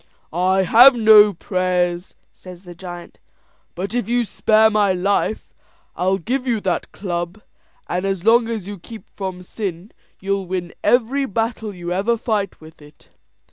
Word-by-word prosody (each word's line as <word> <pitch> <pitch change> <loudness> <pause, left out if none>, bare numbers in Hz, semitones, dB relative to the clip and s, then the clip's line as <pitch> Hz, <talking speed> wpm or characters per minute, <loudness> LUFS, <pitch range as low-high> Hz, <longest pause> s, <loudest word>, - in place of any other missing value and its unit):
"I 185 +2 +2
have 245 +7 +7
no 215 -2 +7
prayers," 180 -1 -2 0.2
says 180 0 -13
the 175 -2 -11
giant; 175 0 -10 0.6
"but 195 +4 -5
if 240 -3 -2
you 240 0 +1
spare 220 +1 +3
my 205 -3 +2
life 200 +4 -1 0.4
I'll 190 +2 +1
give 250 +8 -3
you 235 -3 +1
that 185 -3 -2
club; 175 0 -5 0.5
and 180 +1 -2
as 195 -2 -3
long 230 +1 +4
as 225 -5 -4
you 205 -2 -7
keep 225 +5 -11
from 185 -2 -5
sin, 185 0 -6 0.3
you'll 195 -1 -2
win 180 -1 -4
every 260 +3 +2
battle 225 0 -3
you 175 -2 -5
ever 210 +6 0
fight 215 -4 -2
with 160 0 -16
it." 150 0 -19
195 Hz, 155 wpm, -20 LUFS, 180-220 Hz, 0.6 s, have